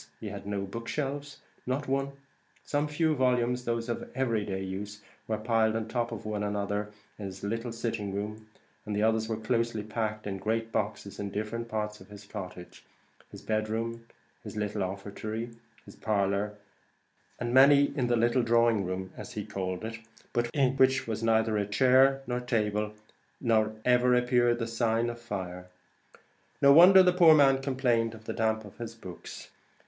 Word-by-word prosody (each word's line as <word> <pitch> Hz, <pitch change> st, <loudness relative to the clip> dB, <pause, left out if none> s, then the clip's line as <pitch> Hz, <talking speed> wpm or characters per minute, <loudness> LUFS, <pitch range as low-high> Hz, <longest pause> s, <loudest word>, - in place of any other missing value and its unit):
he -, -, -5 dB
had -, -, -8 dB
no 100 Hz, -1 st, -2 dB
book 115 Hz, +4 st, -7 dB
shelves, 145 Hz, 0 st, -3 dB, 0.3 s
not 135 Hz, +3 st, -1 dB
one; 135 Hz, +1 st, -1 dB, 0.5 s
some 145 Hz, +1 st, 0 dB
few 155 Hz, +1 st, +1 dB
volumes, 125 Hz, -1 st, +1 dB
those 115 Hz, 0 st, -1 dB
of 120 Hz, -, -4 dB
every 115 Hz, -5 st, 0 dB
day 95 Hz, -1 st, -3 dB
use, 100 Hz, +2 st, -6 dB, 0.2 s
were 110 Hz, -, -1 dB
piled 110 Hz, 0 st, +1 dB
on 115 Hz, -, -1 dB
the 110 Hz, -, -11 dB
top 120 Hz, -1 st, 0 dB
of 115 Hz, -2 st, -7 dB
one 105 Hz, -1 st, -2 dB
another 105 Hz, 0 st, -2 dB, 0.3 s
in 105 Hz, -, -5 dB
his 95 Hz, 0 st, -8 dB
little 115 Hz, +3 st, -3 dB
sitting 115 Hz, -3 st, -3 dB
room; 105 Hz, +2 st, -5 dB, 0.4 s
the 105 Hz, 0 st, 0 dB
others 110 Hz, 0 st, +2 dB
were 110 Hz, -, -1 dB
closely 115 Hz, -1 st, -1 dB
packed 110 Hz, 0 st, -3 dB
in 100 Hz, -1 st, -3 dB
great 115 Hz, +3 st, -1 dB
boxes 105 Hz, -2 st, -3 dB
in 100 Hz, -1 st, -3 dB
different 110 Hz, +3 st, -4 dB
parts 105 Hz, -1 st, -3 dB
of -, -, -15 dB
the 105 Hz, -, -10 dB
cottage 90 Hz, -4 st, -8 dB, 0.5 s
his -, -, -12 dB
bed 110 Hz, 0 st, -1 dB
room, 115 Hz, +1 st, -3 dB, 0.4 s
his 105 Hz, -1 st, -8 dB
little 105 Hz, 0 st, -2 dB
offertory, 105 Hz, +4 st, -4 dB, 0.3 s
his -, -, -13 dB
parlour, 105 Hz, 0 st, 0 dB, 0.8 s
and 120 Hz, 0 st, -2 dB
many 140 Hz, +2 st, +6 dB
in 125 Hz, -4 st, 0 dB
a 120 Hz, -, +3 dB
little 120 Hz, +2 st, +3 dB
drawing 115 Hz, -2 st, +3 dB
room, 95 Hz, +1 st, -4 dB
as 125 Hz, -, -9 dB
he 105 Hz, -3 st, -4 dB
called 95 Hz, +1 st, -4 dB
it, 115 Hz, 0 st, -6 dB, 0.3 s
but 120 Hz, 0 st, 0 dB
in 135 Hz, -1 st, +2 dB
which 130 Hz, 0 st, +4 dB
was 110 Hz, -1 st, -3 dB
neither 110 Hz, -2 st, +2 dB
chair 130 Hz, +5 st, +4 dB
nor 125 Hz, -1 st, -2 dB
table, 105 Hz, -4 st, -1 dB, 0.5 s
nor 110 Hz, -3 st, +2 dB
ever 125 Hz, 0 st, +4 dB
appeared 125 Hz, -1 st, +3 dB
the 115 Hz, -, -2 dB
sign 115 Hz, 0 st, 0 dB
of 120 Hz, -, -10 dB
fire! 90 Hz, -5 st, -5 dB, 0.9 s
No 140 Hz, 0 st, +7 dB
wonder 185 Hz, +4 st, +9 dB
the 180 Hz, -1 st, +4 dB
poor 170 Hz, -3 st, +7 dB
man 135 Hz, -2 st, +5 dB
complained 125 Hz, -4 st, +1 dB
the 110 Hz, 0 st, -7 dB
damp 110 Hz, -1 st, 0 dB
got 105 Hz, -, -11 dB
to -, -, -11 dB
his 115 Hz, 0 st, -6 dB
books. 95 Hz, -6 st, -10 dB
115 Hz, 175 wpm, -29 LUFS, 105-125 Hz, 0.9 s, wonder